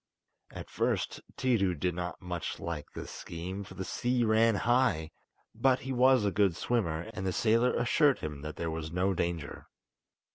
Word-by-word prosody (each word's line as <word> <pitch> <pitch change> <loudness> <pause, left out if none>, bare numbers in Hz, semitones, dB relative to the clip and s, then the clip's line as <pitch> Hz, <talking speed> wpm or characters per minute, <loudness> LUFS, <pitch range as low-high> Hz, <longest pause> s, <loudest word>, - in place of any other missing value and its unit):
At - - -9
first - - -1 0.2
Tiidu 115 -10 +2
did 90 +1 0
not 90 0 -5
much 90 -2 -4
like 80 -3 -4
this - - -6
scheme, 90 +4 -6
for 100 - -12
the 95 - -4
sea 125 +3 0
ran 110 0 +4
high, 120 -9 +2 0.4
but 125 +3 +2
he 135 0 -4
was 130 -2 +5
a 100 - +2
good 95 -2 +2
swimmer, 95 -4 -1
and 95 - -5
the 95 - 0
sailor 115 +5 +2
assured 140 +3 +3
him 75 -2 -6
that 75 0 -6
there 85 -1 -3
was 80 -1 -5
no 95 +3 +1
danger. 85 -4 -3
95 Hz, 175 wpm, -30 LUFS, 85-120 Hz, 0.4 s, was